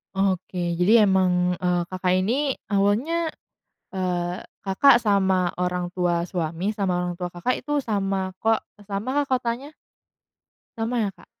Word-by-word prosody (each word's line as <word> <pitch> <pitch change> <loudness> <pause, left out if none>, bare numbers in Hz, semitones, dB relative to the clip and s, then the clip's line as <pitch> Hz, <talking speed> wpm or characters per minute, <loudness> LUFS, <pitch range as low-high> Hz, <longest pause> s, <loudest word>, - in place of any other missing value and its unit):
Oke, 185 -2 -1
jadi 180 +4 +2 0.2
emang, 180 -2 +2
eee, 180 0 0
Kakak 185 0 -1
ini 265 +9 +1 0.2
awalnya, 235 +12 +1 0.6
eee, 180 -1 -2 0.2
Kakak 235 +7 +6
sama 190 -3 +2
orang 180 0 0
tua 175 -2 0
suami, 175 +3 -2
sama 195 -3 0
orang 175 - -2
tua 175 0 -4
Kakak, 175 +9 -1
itu 295 0 -1
sama 195 -6 -1
ko 225 0 +3 0.3
samakah 260 +8 -1
kotanya? 255 +3 -2 1.0
Sama, 230 +2 -1
ya, 200 - -1
Kak? 185 - -20
190 Hz, 130 wpm, -24 LUFS, 180-225 Hz, 1.0 s, Kakak